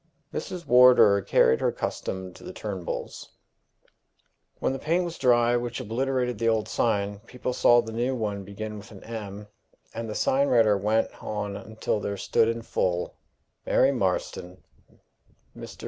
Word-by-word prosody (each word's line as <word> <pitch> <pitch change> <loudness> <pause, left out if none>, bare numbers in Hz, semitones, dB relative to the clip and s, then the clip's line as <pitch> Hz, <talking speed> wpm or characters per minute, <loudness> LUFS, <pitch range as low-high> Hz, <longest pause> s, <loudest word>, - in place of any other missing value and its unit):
Mrs. 180 -2 -5
Wardour 125 -6 +6
carried 65 - +3
her - - +2
custom 95 -1 -4
to - - -15
the - - -7
Turnbulls. 95 -5 -5 1.3
When - - -1
the 135 - -4
paint 170 +5 0
was 170 -1 -6
dry 120 -2 +4
which 120 0 -2
obliterated 125 +2 -1
the 115 0 +2
old 110 -1 0
sign, 100 -3 0
people 125 0 -4
saw 120 -1 +5
the 110 - -7
now 120 +4 -1
one 105 -4 -3
begin 105 +2 -7
with 105 - -13
an 100 -3 -13
M., 105 -3 -7 0.5
and 115 -1 -5
the 105 - -5
sign 140 +2 +2
writer 115 -5 +4
went 105 +3 +1
on 105 -1 -4
until 110 +1 -3
there 100 0 -4
stood 110 - +2
in 115 0 -2
full, 90 -5 -1 0.5
Mary - - +3
Marston. - - -2 0.9
Mr. - - -10
115 Hz, 155 wpm, -26 LUFS, 105-125 Hz, 1.3 s, Wardour